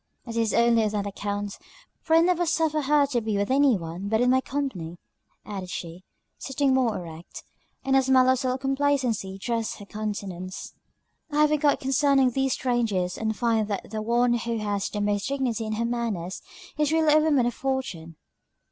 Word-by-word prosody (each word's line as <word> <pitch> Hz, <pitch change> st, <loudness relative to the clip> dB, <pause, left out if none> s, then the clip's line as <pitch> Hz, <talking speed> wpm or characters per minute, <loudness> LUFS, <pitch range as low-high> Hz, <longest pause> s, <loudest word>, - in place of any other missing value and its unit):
It 230 Hz, -2 st, -7 dB
is 225 Hz, -2 st, +1 dB
only 235 Hz, -1 st, +4 dB
on 215 Hz, -, +1 dB
that 205 Hz, -1 st, -1 dB
account, 205 Hz, 0 st, -4 dB, 0.4 s
for 320 Hz, -, +2 dB
I 330 Hz, -, +7 dB
never 350 Hz, 0 st, +2 dB
suffer 310 Hz, -1 st, +1 dB
her 290 Hz, +1 st, +3 dB
to 260 Hz, -4 st, -1 dB
be 215 Hz, -2 st, -1 dB
with 200 Hz, +4 st, -1 dB
any 270 Hz, -4 st, +4 dB
one 170 Hz, +3 st, -6 dB
but 220 Hz, +2 st, +1 dB
in 250 Hz, +1 st, +3 dB
my 260 Hz, 0 st, +3 dB
company," 230 Hz, -, -4 dB, 0.5 s
added 195 Hz, -3 st, -6 dB
she, 175 Hz, +1 st, -7 dB, 0.4 s
sitting 270 Hz, 0 st, 0 dB
more 250 Hz, -5 st, +2 dB
erect; 165 Hz, -1 st, -9 dB, 0.4 s
and 270 Hz, 0 st, +2 dB
a 270 Hz, -, +6 dB
smile 260 Hz, -1 st, +4 dB
of 260 Hz, -1 st, +3 dB
self 255 Hz, 0 st, -1 dB
complacency 270 Hz, -8 st, 0 dB
dressed 230 Hz, +2 st, -2 dB
her 205 Hz, -, -10 dB
countenance. 200 Hz, -3 st, -5 dB, 0.6 s
"I 295 Hz, +1 st, +2 dB
have 300 Hz, 0 st, +4 dB
enquired 295 Hz, -1 st, +2 dB
concerning 270 Hz, -1 st, +3 dB
these 270 Hz, +1 st, 0 dB
strangers, 225 Hz, -8 st, 0 dB
and 220 Hz, -1 st, -2 dB
find 225 Hz, -3 st, +1 dB
that 200 Hz, -1 st, -4 dB
the 215 Hz, -1 st, -3 dB
one 240 Hz, +2 st, +2 dB
who 235 Hz, 0 st, -1 dB
has 205 Hz, -2 st, -2 dB
the 210 Hz, -, -3 dB
most 205 Hz, -1 st, 0 dB
dignity 255 Hz, -5 st, -1 dB
in 215 Hz, -, -2 dB
her 230 Hz, +2 st, -1 dB
manners, 225 Hz, -7 st, -3 dB, 0.4 s
is 300 Hz, -1 st, +2 dB
really 320 Hz, -2 st, +4 dB
a 305 Hz, -, +6 dB
woman 295 Hz, -5 st, +3 dB
of 240 Hz, -, 0 dB
fortune." 255 Hz, -13 st, -4 dB
235 Hz, 190 wpm, -26 LUFS, 205-270 Hz, 0.6 s, I